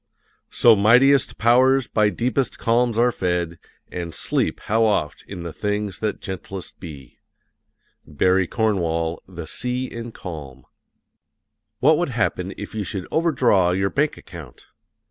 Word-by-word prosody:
So 115 -2 +5
mightiest 125 +7 +4
powers 130 +3 +4
by 105 -2 +2
deepest 120 +5 -1
calms 115 0 +1
are 120 +1 +4
fed, 90 -5 -2 0.3
And 85 -2 -5
sleep, - - -1
how 110 +2 +1
oft, 100 -9 0
in 90 -3 -7
things 105 +2 -3
that 110 -1 -2
gentlest 95 0 -7
be! 70 -8 -11 0.9
BARRY 90 +5 +2
CORNWALL, 85 -7 -1
The 85 -3 -8
Sea 125 +10 -3
in 115 -2 -7
Calm. 70 - -9 1.2
What 150 +4 +5
would 175 - 0
happen 105 -6 -1
if 105 - -8
you 110 -1 -3
should 95 -1 -5
overdraw 125 - +2
your 95 +1 0
bank 150 +2 0
account? 80 -8 -12
105 Hz, 130 wpm, -22 LUFS, 90-120 Hz, 1.2 s, So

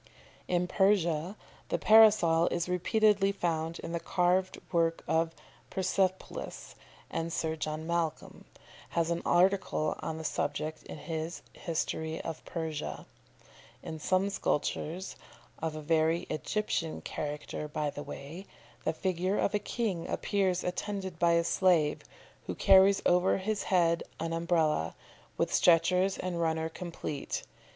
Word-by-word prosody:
] - - -28
In 175 - +1
Persia 180 -2 +2 0.3
the - - +1
Parasol 210 -7 +6
is 170 0 -1
repeatedly 200 +2 +3
found 165 -3 -2
in - - -6
the 170 - -1
carved 180 +2 +1
work 165 -2 +1
of 165 0 +1 0.3
Persepolis, 190 0 -2 0.4
and 165 0 -2
Sir 160 -1 -1
John 155 0 -4
Malcolm 170 -2 -2 0.5
has 165 0 +2
an 170 - -1
article 180 -4 +2
on 160 - -4
the 160 - -6
subject 155 +1 -2
in - - -7
his 160 +2 -5
"History 160 -1 -3
of 160 - -6
Persia." 160 -3 -4 0.8
In 160 - -6
some 185 +5 +1
sculptures 175 +1 -2 0.4
of 160 -1 -3
a 155 - -5
very 160 +2 +2
Egyptian 165 +1 -2
character, 150 0 -5
by 150 0 -2
the 145 - -7
way 160 +8 -8 0.4
the 160 - 0
figure 185 +3 -1
of - - +1
a 210 - +2
king 205 -7 -2
appears 190 -3 0
attended 190 -1 -4
by 170 -1 +4
a 170 0 +3
slave, 170 -4 +2 0.5
who - - -3
carries 195 +1 +6
over 180 +2 +4
his 205 +2 -2
head 170 -3 +3 0.2
an 165 +1 -2
Umbrella, 165 - +1 0.4
with - - 0
stretchers 180 +3 +4
and 175 -2 -3
runner 160 -1 0
complete. 165 -4 -5
170 Hz, 135 wpm, -30 LUFS, 160-185 Hz, 0.8 s, Parasol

